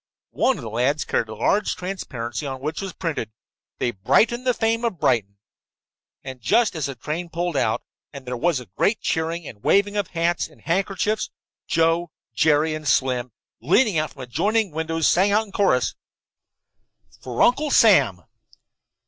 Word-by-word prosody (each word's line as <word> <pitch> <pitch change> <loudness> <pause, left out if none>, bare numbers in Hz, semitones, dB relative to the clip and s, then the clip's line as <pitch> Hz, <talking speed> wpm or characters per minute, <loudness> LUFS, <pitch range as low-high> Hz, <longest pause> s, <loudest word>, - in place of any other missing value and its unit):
One 265 - +2
of 140 - -8
the 115 - -5
lads 130 +6 0
carried 110 - -1
a 110 - -6
large 205 - +1
transparency 140 - -5
on 135 -1 -5
which 150 +3 -4
was 195 -1 -4
printed: 160 - -3 0.5
"THEY 120 - 0
BRIGHTEN 230 - +2
THE 250 - +3
FAME 225 +1 0
OF 225 -8 -2
BRIGHTON" 100 -7 +1 0.9
And 130 -2 -8
just 205 - +2
as 155 -4 -2
the 135 - -6
train 155 +8 -4
pulled 170 0 -2
out, 110 -4 0 0.3
and 140 -2 -10
there 125 0 -3
was 130 -1 0
great 215 - +1
cheering 165 0 -2
and 105 -2 -11
waving 205 +1 +3
of 205 -3 0
hats 170 0 0
and - - -21
handkerchiefs, 195 +4 -1 0.4
Joe, 165 +1 +2 0.2
Jerry 155 0 +3
and 155 -1 -5
Slim, 125 -3 +1 0.3
leaning 175 - +3
from 135 - -11
adjoining 200 - 0
windows, 160 +1 0
sang 190 +3 +3
out 220 +1 +3
in 200 - -16
chorus: 190 -12 +2 1.3
"For 125 -2 -6
Uncle 290 +5 +3
Sam." 140 - +4
160 Hz, 160 wpm, -23 LUFS, 130-195 Hz, 1.3 s, Sam